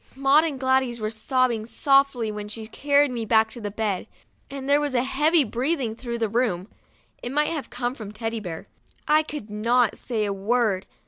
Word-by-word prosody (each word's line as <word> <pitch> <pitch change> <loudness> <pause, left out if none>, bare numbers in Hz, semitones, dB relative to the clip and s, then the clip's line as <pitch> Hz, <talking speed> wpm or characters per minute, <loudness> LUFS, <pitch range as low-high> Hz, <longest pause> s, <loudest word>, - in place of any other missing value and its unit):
Maud 275 +3 +4
and 290 -5 -3
Gladys 260 -2 +1
were 215 0 -2
sobbing 235 0 0
softly 275 -4 +2
when 210 0 -6
she 220 +1 -7
carried 285 +4 +2
me 235 -2 -3
back 220 0 +3
to 240 - -9
bed, 205 -2 -2 0.4
and 275 -1 -6
there 285 +1 +4
was 290 -3 -2
a 245 - +3
heavy 300 +4 +3
breathing 250 0 -1
through 235 0 -5
the 225 -1 0
room; 210 -5 0 0.5
it 245 - -5
might 295 +2 +2
have 300 -7 -4
come 245 0 -2
from 215 -6 -8
Teddy 225 +1 -4
Bear. 175 -6 -7 0.4
I 305 +1 +5
could 295 -8 -7
not 230 +2 +2
say 220 -4 -2
a 200 - -1
word. 205 -1 0
240 Hz, 190 wpm, -24 LUFS, 220-275 Hz, 0.5 s, I